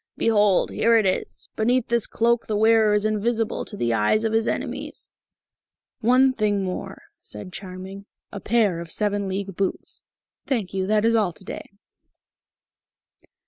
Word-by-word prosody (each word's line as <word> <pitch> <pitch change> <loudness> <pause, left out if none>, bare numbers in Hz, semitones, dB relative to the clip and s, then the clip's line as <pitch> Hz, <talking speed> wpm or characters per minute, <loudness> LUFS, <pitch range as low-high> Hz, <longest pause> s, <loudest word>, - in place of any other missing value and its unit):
"Behold, 210 -4 +3
here 230 0 +3
it 220 - +2
is. 185 - -2
Beneath 240 +2 +1
this 235 -2 +1
cloak 235 +1 +1
the 215 - -1
wearer 220 0 +4
is 210 0 +1
invisible 220 +1 -1
to 205 - -7
the 120 -7 0
eyes 115 - +2
of 220 - 0
his 225 0 +1
enemies." - - -4 0.9
"One 255 +3 +4
thing 205 -4 0
more," 185 -1 -5 0.2
said 105 +13 -9
Charming. 190 +1 -8 0.2
"A 200 - -6
pair 205 -5 +1
of 170 -1 -8
seven 205 +1 -1
league 195 0 -4
boots.... 195 0 -3 0.5
Thank 225 -9 -2
you. 190 -1 -1
That 210 +1 +2
is 230 0 +3
all 205 -6 +1
to 190 - -12
day." - - -7
210 Hz, 155 wpm, -23 LUFS, 195-225 Hz, 0.9 s, wearer